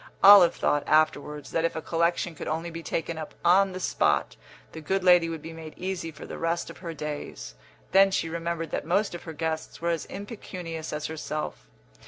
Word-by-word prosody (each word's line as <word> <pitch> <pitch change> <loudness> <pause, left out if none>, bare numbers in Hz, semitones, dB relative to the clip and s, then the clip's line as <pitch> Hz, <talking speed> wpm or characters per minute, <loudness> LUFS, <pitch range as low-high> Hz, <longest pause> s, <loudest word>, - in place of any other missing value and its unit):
Olive 195 -4 +9
thought, 145 -1 +1
afterwards, 150 -2 +1
that 165 - 0
if 165 - 0
a - - -1
collection 170 +1 0
could 155 - -7
only 165 +2 -2
be 165 0 -6
taken 165 +1 -3
up 155 - -7
on 190 +2 +5
the 185 - -6
spot, - - +1 0.4
the 160 - -8
good 190 +5 -1
lady 180 -2 +6
would 160 -2 -6
be 165 - -7
made 160 -1 -9
easy 185 -2 -3
for 150 - -10
the - - -7
rest 170 +1 -1
of - - -14
her 170 -2 -5
days; 150 0 -6 0.4
then 195 +2 +6
she 190 - 0
remembered 165 0 -3
that - - -2
most 195 +6 +1
of 175 - -8
her 165 - -6
guests 160 0 -3
were 170 +1 0
as 165 -2 -2
impecunious 180 -6 -7
as 150 0 -3
herself. 155 - -5
165 Hz, 205 wpm, -27 LUFS, 155-175 Hz, 0.4 s, Olive